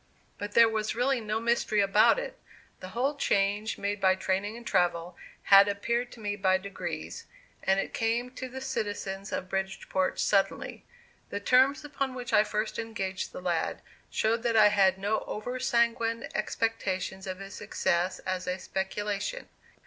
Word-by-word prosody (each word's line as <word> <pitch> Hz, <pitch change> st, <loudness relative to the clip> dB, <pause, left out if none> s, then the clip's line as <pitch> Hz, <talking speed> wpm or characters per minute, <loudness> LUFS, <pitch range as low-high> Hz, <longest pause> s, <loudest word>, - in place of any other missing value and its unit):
But 205 Hz, 0 st, -5 dB
there 230 Hz, -1 st, +7 dB
was 215 Hz, -1 st, -1 dB
really 250 Hz, +1 st, +1 dB
no 215 Hz, 0 st, -1 dB
mystery 230 Hz, -2 st, +1 dB
about 200 Hz, -, +5 dB
it; -, -, -5 dB, 0.4 s
the 185 Hz, -, -8 dB
whole 270 Hz, +4 st, +2 dB
change 205 Hz, -3 st, +1 dB
made 200 Hz, 0 st, -2 dB
by 190 Hz, -1 st, +5 dB
training 195 Hz, +3 st, -1 dB
and 235 Hz, -, -11 dB
travel, 175 Hz, -3 st, +1 dB, 0.3 s
had 195 Hz, 0 st, +8 dB
appeared 235 Hz, +4 st, -1 dB
to -, -, -13 dB
me 205 Hz, -1 st, -2 dB
by 190 Hz, -2 st, +3 dB
degrees, 185 Hz, -, -6 dB, 0.3 s
and 190 Hz, +1 st, +2 dB
it -, -, -3 dB
came 235 Hz, +2 st, 0 dB
to 260 Hz, 0 st, -6 dB
the 265 Hz, +1 st, -7 dB
citizens 205 Hz, -6 st, -3 dB
of 185 Hz, -, -3 dB
Bridgeport 190 Hz, 0 st, -2 dB
suddenly. 195 Hz, -2 st, 0 dB, 0.5 s
The 200 Hz, -, -3 dB
terms 260 Hz, +7 st, +3 dB
upon 275 Hz, -3 st, -3 dB
which 245 Hz, -2 st, -6 dB
I 210 Hz, 0 st, +6 dB
first 215 Hz, 0 st, -2 dB
engaged 195 Hz, -5 st, -3 dB
the -, -, -8 dB
lad 175 Hz, -2 st, -1 dB, 0.3 s
showed 225 Hz, +1 st, +1 dB
that 235 Hz, -1 st, 0 dB
I 210 Hz, -1 st, +8 dB
had 195 Hz, -2 st, +4 dB
no 205 Hz, +3 st, 0 dB
over 245 Hz, +4 st, -4 dB
sanguine 235 Hz, -2 st, +1 dB
expectations 195 Hz, -3 st, -2 dB
of 185 Hz, -1 st, -4 dB
his 195 Hz, 0 st, -9 dB
success 175 Hz, +2 st, 0 dB
as 185 Hz, -1 st, -2 dB
a 180 Hz, 0 st, -1 dB
"speculation." 205 Hz, -, -3 dB
210 Hz, 165 wpm, -29 LUFS, 190-235 Hz, 0.5 s, had